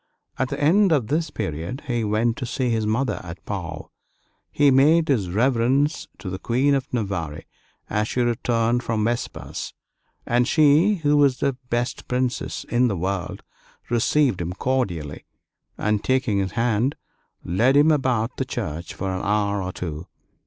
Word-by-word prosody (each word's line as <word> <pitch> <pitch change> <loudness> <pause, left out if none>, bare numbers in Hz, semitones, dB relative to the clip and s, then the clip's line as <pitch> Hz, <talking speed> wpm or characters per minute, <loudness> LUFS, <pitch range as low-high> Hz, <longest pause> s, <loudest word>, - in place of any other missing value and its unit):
At 130 - 0
the - - -4
end 185 +6 +4
of 135 -9 +1
this 160 +1 0
period 85 - -4
he 120 -3 -1
went 110 +2 +1
to 130 - -4
see 125 0 -1
his 110 -2 0
mother 110 +1 0
at 85 -1 -10
Pau. 85 -6 -5 0.6
He 145 -1 +4
made 155 +5 +4
his 105 -10 +1
reverence 130 - +1
to 95 - -6
the 95 - -5
Queen 130 +6 +2
of 135 0 -1
Navarre 95 -10 -3 0.4
as 105 0 0
she 125 - -1
returned 120 0 +1
from 115 -3 -1
vespers; 120 +1 -4 0.5
and 120 +1 +2
she, 155 +7 +4
who 145 0 +4
was 140 -3 +4
the 140 - 0 0.2
best 120 +1 -2
princess 125 0 -2
in 125 +1 +2
the 100 -5 -1
world, 95 +1 -3 0.5
received 120 -2 +2
him 85 +1 -3
cordially, 90 - -2 0.5
and 105 -1 0
taking 130 -6 +1
his 95 -1 -2
hand, 120 +3 +1 0.5
led 120 +11 +2
him 150 +2 +6
about 130 -5 0
the 130 - -1
church 85 - -5
for 95 0 -3
an 95 - -3
hour 100 -1 +1
or 90 0 -3
two. 80 -2 -6
120 Hz, 160 wpm, -23 LUFS, 100-135 Hz, 0.6 s, him